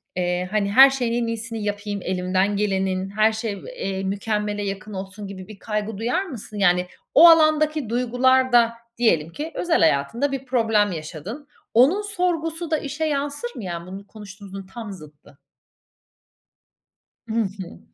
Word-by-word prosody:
eee, 180 Hz, 0 st, -1 dB
hani, 205 Hz, -2 st, 0 dB
"Her 265 Hz, +5 st, +9 dB
şeyin 240 Hz, -3 st, -1 dB
en -, -, -2 dB
iyisini 230 Hz, -1 st, -4 dB
yapayım, 205 Hz, 0 st, -3 dB
elimden 185 Hz, +2 st, 0 dB
gelenin, 190 Hz, -2 st, -1 dB
her 215 Hz, +2 st, +3 dB
şey, 220 Hz, -2 st, -4 dB
v -, -, -10 dB
eee, 195 Hz, -, -3 dB
mükemmele 205 Hz, +1 st, -2 dB
yakın 200 Hz, +1 st, -5 dB
olsun." 195 Hz, +2 st, -7 dB
gibi 190 Hz, -1 st, -9 dB
bir 215 Hz, -2 st, -12 dB
kaygı 210 Hz, -1 st, -3 dB
duyar 245 Hz, -, 0 dB
mısın? 235 Hz, -, -9 dB
Yani, 180 Hz, -2 st, +3 dB, 0.3 s
o 335 Hz, +3 st, +9 dB
alandaki 310 Hz, -4 st, +4 dB
duygular 250 Hz, +2 st, +2 dB
da, 235 Hz, -1 st, +5 dB, 0.2 s
diyelim 170 Hz, -10 st, +2 dB
ki, 305 Hz, -, -6 dB
özel 350 Hz, -2 st, +1 dB
hayatında 165 Hz, -, +2 dB
bir 270 Hz, -1 st, -4 dB
problem 225 Hz, -5 st, +2 dB
yaşadın. 175 Hz, -, -7 dB, 0.3 s
Onun 275 Hz, -, +5 dB
sorgusu 345 Hz, -5 st, -2 dB
da 315 Hz, -, +3 dB
işe 300 Hz, +2 st, -3 dB
yansır 290 Hz, +8 st, -2 dB
mı, -, -, -7 dB
ya, 170 Hz, -2 st, -5 dB
bunu 195 Hz, +2 st, -9 dB
konuştuğumuzun 195 Hz, -2 st, -10 dB
tam 225 Hz, -3 st, -7 dB
zıttı. 150 Hz, -5 st, -14 dB, 1.9 s
Hı -, -, -3 dB
hı. 190 Hz, -2 st, -8 dB
215 Hz, 155 wpm, -23 LUFS, 195-260 Hz, 1.9 s, Her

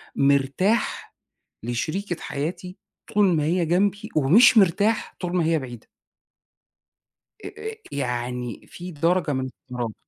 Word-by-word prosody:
مرتاح 140 Hz, -, +1 dB, 0.5 s
لشريكة 160 Hz, -, -3 dB
حياتي 180 Hz, +6 st, -5 dB, 0.4 s
طول 205 Hz, -1 st, +5 dB
ما 150 Hz, -, +1 dB
هي 170 Hz, +3 st, +1 dB
جنبي 200 Hz, +5 st, +1 dB
ومش 215 Hz, -, +6 dB
مرتاح 205 Hz, +3 st, +2 dB
طول 180 Hz, 0 st, -2 dB
ما 170 Hz, -, +2 dB
هي 165 Hz, 0 st, +2 dB
بعيدة. 120 Hz, -5 st, -9 dB, 1.6 s
آآ -, -, -4 dB, 0.2 s
آآ 440 Hz, -, -5 dB, 0.2 s
يعني 125 Hz, -3 st, -4 dB
في 180 Hz, +1 st, -9 dB
درجة 165 Hz, +1 st, +1 dB
من 130 Hz, -, -1 dB, 0.3 s
الاحترام. 120 Hz, -4 st, -4 dB
165 Hz, 120 wpm, -24 LUFS, 135-190 Hz, 1.6 s, ومش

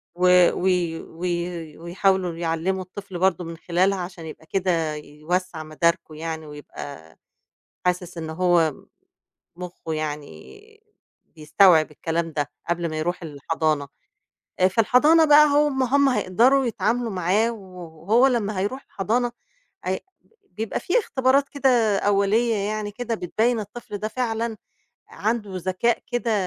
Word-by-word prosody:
و 180 Hz, 0 st, +5 dB
وي 175 Hz, -3 st, +1 dB
وي 170 Hz, -2 st, -4 dB
ويحاولوا 180 Hz, +1 st, 0 dB
يعلّموا 170 Hz, +3 st, -1 dB
الطفل 190 Hz, 0 st, -8 dB
برضه 185 Hz, -1 st, +2 dB
من 165 Hz, 0 st, -7 dB
خلالها 185 Hz, +4 st, +1 dB
عشان 175 Hz, -2 st, -7 dB
يبقى 160 Hz, 0 st, -10 dB
كده 165 Hz, -4 st, 0 dB
يوسّع 155 Hz, +3 st, -4 dB
مداركه 165 Hz, +1 st, -1 dB
يعني 160 Hz, 0 st, -5 dB
ويبقى 145 Hz, -, -10 dB, 0.7 s
حاسس 180 Hz, -1 st, -1 dB
إن 160 Hz, -1 st, -5 dB
هو 170 Hz, -2 st, +2 dB, 0.8 s
مخّه 180 Hz, -2 st, -7 dB
يعني 155 Hz, -, -7 dB, 0.4 s
بيستوعب 160 Hz, +1 st, +3 dB
الكلام 165 Hz, +2 st, -2 dB
ده، 145 Hz, -4 st, -2 dB, 0.2 s
قبل 170 Hz, -1 st, -1 dB
ما 155 Hz, -, -4 dB
يروح 175 Hz, +3 st, -2 dB
الحضانة، 155 Hz, -1 st, -2 dB, 0.7 s
آآ 185 Hz, -, +6 dB
في 190 Hz, +4 st, +1 dB
الحضانة 295 Hz, +9 st, +5 dB
بقى 300 Hz, 0 st, +7 dB
هو 295 Hz, 0 st, +4 dB
م 265 Hz, -1 st, -1 dB
هُم 275 Hz, +2 st, +3 dB
هيقدروا 255 Hz, +4 st, +3 dB
يتعاملوا 230 Hz, +1 st, -1 dB
معاه 195 Hz, +4 st, +1 dB
وهو 185 Hz, +2 st, 0 dB
لمّا 215 Hz, -6 st, 0 dB
هيروح 210 Hz, +8 st, -3 dB
الحضانة 235 Hz, +5 st, -1 dB, 0.5 s
أي 185 Hz, +1 st, -1 dB, 0.5 s
بيبقى 220 Hz, 0 st, -4 dB
في 370 Hz, -, +1 dB
اختبارات 275 Hz, -, +2 dB
كده 245 Hz, -7 st, +2 dB
أولية 205 Hz, +4 st, +2 dB
يعني 210 Hz, +1 st, -2 dB
كده، 230 Hz, +2 st, -3 dB
بتبيّن 225 Hz, +4 st, 0 dB
الطفل 210 Hz, 0 st, -7 dB
ده 215 Hz, -, -3 dB
فعلًا 225 Hz, -1 st, -2 dB, 0.5 s
عنده 220 Hz, -2 st, -2 dB
ذكاء 185 Hz, +6 st, 0 dB
كده 240 Hz, -1 st, 0 dB
185 Hz, 130 wpm, -23 LUFS, 165-225 Hz, 0.8 s, بقى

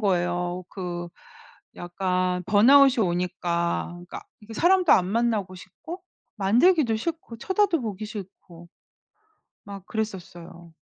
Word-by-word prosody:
거예요. 175 Hz, -2 st, -1 dB
그 175 Hz, -2 st, -6 dB, 0.7 s
약간 180 Hz, 0 st, -2 dB
번아웃이 250 Hz, +3 st, +6 dB
오니까 175 Hz, -1 st, -1 dB
그러니까 175 Hz, 0 st, -9 dB, 0.2 s
이게 220 Hz, +1 st, -11 dB
사람도 360 Hz, -, +4 dB
안 180 Hz, -2 st, +4 dB
만나고 210 Hz, -3 st, -1 dB
싶고 345 Hz, -, -10 dB, 0.4 s
만들기도 235 Hz, -, +3 dB
싫고, 315 Hz, -3 st, -5 dB
쳐다도 380 Hz, -, +1 dB
보기 215 Hz, -1 st, -5 dB
싫고 185 Hz, -5 st, -11 dB, 1.0 s
막 200 Hz, -2 st, -9 dB
그랬었어요. 175 Hz, -6 st, -7 dB
195 Hz, 260 characters per minute, -25 LUFS, 175-235 Hz, 1.0 s, 번아웃이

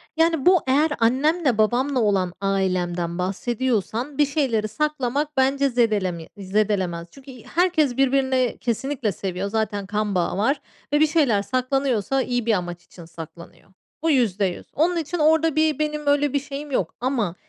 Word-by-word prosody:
Yani, 325 Hz, -3 st, +2 dB
bu 365 Hz, -2 st, +6 dB
eğer 290 Hz, +4 st, +3 dB
annemle 265 Hz, +3 st, +2 dB
babamla 250 Hz, +5 st, +2 dB
olan 195 Hz, -5 st, +1 dB
ailemden 180 Hz, -3 st, -1 dB
bahsediyorsan 235 Hz, +6 st, -2 dB
bir 295 Hz, -, +5 dB
şeyleri 265 Hz, -7 st, 0 dB
saklamak 295 Hz, +2 st, -2 dB
bence 275 Hz, +1 st, +2 dB
zedelemi 205 Hz, -9 st, 0 dB
zedelemez. 190 Hz, -4 st, -1 dB
Çünkü 275 Hz, 0 st, -13 dB, 0.2 s
herkes 320 Hz, -8 st, +2 dB
birbirini 265 Hz, -2 st, +2 dB
kesinlikle 245 Hz, -1 st, -1 dB
seviyor. 190 Hz, +1 st, -4 dB
Zaten 210 Hz, -2 st, -2 dB
kan 210 Hz, 0 st, -2 dB
bağı 180 Hz, 0 st, 0 dB
var 270 Hz, +8 st, +1 dB, 0.3 s
ve 295 Hz, -, +4 dB
bir 310 Hz, -, +5 dB
şeyler 285 Hz, -10 st, +2 dB
saklanıyorsa 255 Hz, +1 st, 0 dB
iyi 245 Hz, -2 st, -1 dB
bir 230 Hz, -, +3 dB
amaç 175 Hz, -3 st, -3 dB
için 170 Hz, -, -14 dB
saklanıyor. 165 Hz, +2 st, -12 dB, 0.3 s
Bu 325 Hz, -, +2 dB
%100. 205 Hz, -8 st, 0 dB
Onun 345 Hz, +4 st, +1 dB
için 330 Hz, +2 st, -3 dB
orada 320 Hz, 0 st, +3 dB
bir 310 Hz, -2 st, +2 dB
benim, 300 Hz, -1 st, -2 dB
böyle, 285 Hz, -1 st, +2 dB
bir 285 Hz, -, +2 dB
şeyim 285 Hz, +1 st, -7 dB
yok 190 Hz, -11 st, -1 dB
ama 240 Hz, -8 st, -1 dB
250 Hz, 150 wpm, -23 LUFS, 200-290 Hz, 0.3 s, bu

